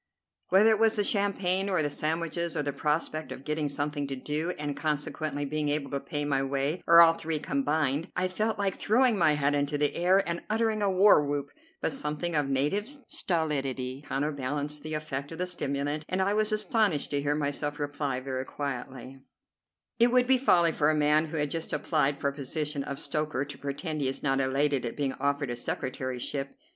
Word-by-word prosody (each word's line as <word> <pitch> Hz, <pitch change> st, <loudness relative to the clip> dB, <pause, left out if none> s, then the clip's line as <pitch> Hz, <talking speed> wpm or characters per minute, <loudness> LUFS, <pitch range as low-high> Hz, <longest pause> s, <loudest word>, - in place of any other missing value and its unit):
Whether 205 Hz, +4 st, +6 dB
it 215 Hz, -, +2 dB
was 225 Hz, -1 st, +4 dB
the 205 Hz, -, +1 dB
champagne, 195 Hz, -2 st, +1 dB
or 185 Hz, -5 st, +2 dB
the 145 Hz, -, -1 dB
sandwiches, 165 Hz, +3 st, -2 dB
or 150 Hz, -, 0 dB
the 145 Hz, -1 st, -2 dB
prospect 155 Hz, +2 st, -1 dB
of 130 Hz, -, -7 dB
getting 150 Hz, -1 st, -1 dB
something 145 Hz, 0 st, -2 dB
to 135 Hz, -, -4 dB
do, 150 Hz, +5 st, -2 dB
and 145 Hz, -1 st, -3 dB
consequently 150 Hz, -1 st, -2 dB
being 150 Hz, +1 st, -1 dB
able 145 Hz, -1 st, -1 dB
to 140 Hz, -, -1 dB
pay 145 Hz, +1 st, -4 dB
my 140 Hz, -2 st, +1 dB
way, 140 Hz, +4 st, -1 dB
or 170 Hz, 0 st, +9 dB
all 165 Hz, -1 st, +7 dB
three 160 Hz, -1 st, -3 dB
combined, 145 Hz, +2 st, 0 dB
I 180 Hz, 0 st, +1 dB
felt 215 Hz, +4 st, -1 dB
like 200 Hz, -2 st, -1 dB
throwing 245 Hz, +2 st, +3 dB
my 165 Hz, -6 st, +4 dB
hat 145 Hz, -1 st, +1 dB
into 145 Hz, +1 st, 0 dB
the 145 Hz, 0 st, +1 dB
air 185 Hz, +3 st, +3 dB
and 170 Hz, 0 st, -2 dB
uttering 220 Hz, 0 st, +1 dB
a 200 Hz, -, +2 dB
war 190 Hz, -4 st, +6 dB
whoop; 145 Hz, -1 st, -3 dB, 0.3 s
but -, -, +1 dB
something 170 Hz, -, -3 dB
of 145 Hz, -2 st, +1 dB
native 145 Hz, -, 0 dB, 0.2 s
stolidity 135 Hz, -6 st, -1 dB
counterbalanced 145 Hz, +1 st, -2 dB
the 155 Hz, +1 st, -4 dB
effect 150 Hz, -1 st, -4 dB
of -, -, -8 dB
the 180 Hz, -, -1 dB
stimulant, 145 Hz, -3 st, -2 dB
and 185 Hz, -, -1 dB
I 195 Hz, +2 st, +2 dB
was 215 Hz, +1 st, +2 dB
astonished 215 Hz, -, +1 dB
to 145 Hz, -1 st, 0 dB
hear 145 Hz, +1 st, 0 dB
myself 145 Hz, 0 st, -2 dB
reply 145 Hz, -3 st, -2 dB
very 130 Hz, -1 st, -3 dB
quietly: 135 Hz, -1 st, -6 dB, 0.8 s
"It 235 Hz, +1 st, +5 dB
would 250 Hz, 0 st, +4 dB
be 260 Hz, 0 st, +4 dB
folly 170 Hz, -10 st, +4 dB
for 150 Hz, -1 st, +2 dB
a 155 Hz, -, +2 dB
man 150 Hz, +1 st, +3 dB
who 160 Hz, -, -5 dB
had 150 Hz, -1 st, -1 dB
just 165 Hz, -1 st, -4 dB
applied 150 Hz, -3 st, +1 dB
for 140 Hz, -, 0 dB
the 140 Hz, -, -16 dB
position 150 Hz, +1 st, -2 dB
of 140 Hz, -, -5 dB
stoker 150 Hz, -3 st, -2 dB
to 145 Hz, -1 st, -9 dB
pretend 150 Hz, +2 st, -4 dB
he 135 Hz, -, +1 dB
is 135 Hz, -, -3 dB
not 135 Hz, -1 st, +2 dB
elated 135 Hz, 0 st, +1 dB
at 120 Hz, -, -4 dB
being 140 Hz, -2 st, -1 dB
offered 140 Hz, -2 st, 0 dB
a -, -, -2 dB
secretaryship. 130 Hz, -, -3 dB
150 Hz, 200 wpm, -28 LUFS, 140-170 Hz, 0.8 s, or